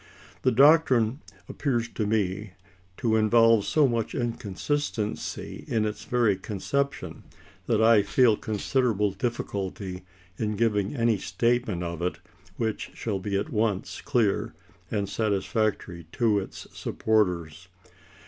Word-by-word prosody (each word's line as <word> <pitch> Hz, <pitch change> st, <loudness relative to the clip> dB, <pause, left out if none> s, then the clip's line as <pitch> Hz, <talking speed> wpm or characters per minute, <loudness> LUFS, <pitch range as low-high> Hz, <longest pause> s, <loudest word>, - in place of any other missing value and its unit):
The -, -, +3 dB
doctrine 135 Hz, -2 st, +4 dB, 0.3 s
appears 120 Hz, -5 st, -1 dB
to 110 Hz, -2 st, -2 dB
me 105 Hz, -2 st, -1 dB, 0.4 s
to 115 Hz, -3 st, +1 dB
involve 115 Hz, -1 st, +5 dB
so 150 Hz, -3 st, +3 dB
much 115 Hz, -3 st, -2 dB
inconsistency 115 Hz, 0 st, -3 dB
in 110 Hz, -2 st, +1 dB
its 105 Hz, 0 st, -4 dB
very 120 Hz, -5 st, +2 dB
conception 140 Hz, +9 st, -3 dB, 0.5 s
that 110 Hz, -2 st, +2 dB
I 115 Hz, -2 st, +6 dB
feel 110 Hz, +3 st, +4 dB
considerable 110 Hz, -1 st, 0 dB
difficulty 95 Hz, -4 st, -4 dB, 0.3 s
in 105 Hz, -1 st, -1 dB
giving 105 Hz, +1 st, 0 dB
any 115 Hz, -4 st, +2 dB
statement 110 Hz, -1 st, 0 dB
of 85 Hz, -1 st, -4 dB
it 90 Hz, 0 st, -1 dB, 0.4 s
which 110 Hz, -2 st, -2 dB
shall 105 Hz, -4 st, -2 dB
be 100 Hz, +1 st, -2 dB
at 100 Hz, -, -3 dB
once 105 Hz, -2 st, -1 dB
clear 115 Hz, -7 st, 0 dB, 0.3 s
and 100 Hz, -2 st, -1 dB
satisfactory 100 Hz, -4 st, -1 dB
to 110 Hz, -4 st, +2 dB
its 95 Hz, -, -8 dB
supporters. 90 Hz, -6 st, -1 dB
110 Hz, 120 wpm, -26 LUFS, 100-120 Hz, 0.5 s, I